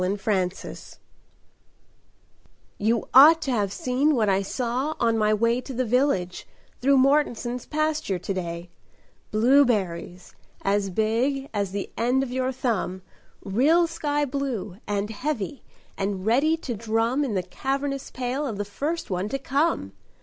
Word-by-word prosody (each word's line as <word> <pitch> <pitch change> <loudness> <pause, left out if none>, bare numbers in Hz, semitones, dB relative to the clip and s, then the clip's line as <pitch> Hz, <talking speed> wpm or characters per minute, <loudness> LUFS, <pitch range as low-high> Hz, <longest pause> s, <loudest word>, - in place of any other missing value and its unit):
Blueberries 190 -1 -2 1.8
"YOU 225 +2 +1
ought 305 +5 +9
to 275 - -1
have 205 -5 0
seen 265 +7 +1
what 215 -4 +2
I 195 0 +2
saw 250 +8 -2
on 230 -1 +2
my 215 -1 +2
way 230 +3 +2
To 260 0 -8
the 255 +1 0
village, 230 -7 0 0.3
through 275 +2 +4
Mortenson's 260 -3 +1
pasture 310 -9 -1
to 180 +3 -4
day: 170 -1 -5 0.6
Blueberries 215 -8 +1 0.3
as 200 0 +1
big 235 +8 0
as 200 -3 -1
the 200 0 -4
end 250 +4 +2
of 255 - -5
your 260 0 0
thumb, 225 -8 -2 0.4
Real 285 - +3
sky 295 -3 -1
blue, 255 -9 -3
and 205 +1 -1
heavy, 260 +2 -3 0.4
and 195 -1 -2
ready 280 +8 +3
to 270 -6 -5
drum 225 +5 0
In 245 -7 -2
the 185 - 0
cavernous 275 +8 -3
pail 260 +3 -3
of 220 -6 -4
the 205 - -2
first 290 +8 -3
one 185 +3 -1
to 275 - -1
come! 275 - 0
235 Hz, 140 wpm, -25 LUFS, 200-275 Hz, 1.8 s, ought